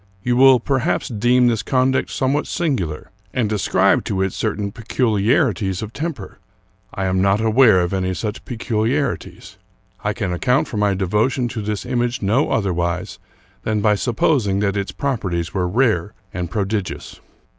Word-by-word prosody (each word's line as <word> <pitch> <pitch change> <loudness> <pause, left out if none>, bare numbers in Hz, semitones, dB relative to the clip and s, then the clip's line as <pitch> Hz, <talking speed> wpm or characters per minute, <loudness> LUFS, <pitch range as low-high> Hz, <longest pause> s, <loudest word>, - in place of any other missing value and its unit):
You 120 +1 +1
will 130 0 +7
perhaps 135 +6 -1
deem 120 +2 +3
this 115 -3 +2
conduct 130 0 +1
somewhat 135 +2 0
singular, 120 - -2 0.2
and 110 -4 0
ascribe 105 - +3
it - - -12
to 95 0 0
certain 105 -1 -2
peculiarities 110 - 0
of 110 +1 -7
temper. 150 - -5 0.5
I 95 - -3
am 95 0 +1
not 100 +1 +3
aware 110 -3 +5
of 90 +2 -2
any 95 -1 -1
such 105 +3 -4
peculiarities. 110 - -2 0.4
I 105 - 0
can 100 -5 -3
account 130 - +1
for 110 - -5
my 105 -1 +2
devotion 105 +7 0
to 115 -2 -4
this 105 +1 -3
image 120 -2 -1
no 115 +9 +2
otherwise 90 -4 -1 0.4
than 110 -1 -1
by 105 0 +4
supposing 110 -2 +1
that 100 -1 0
its 100 -1 -2
properties 95 -11 -2
were 90 -2 0
rare 105 -3 +1 0.2
and 90 -1 -3
prodigious. 100 -2 -3
105 Hz, 155 wpm, -20 LUFS, 95-125 Hz, 0.5 s, will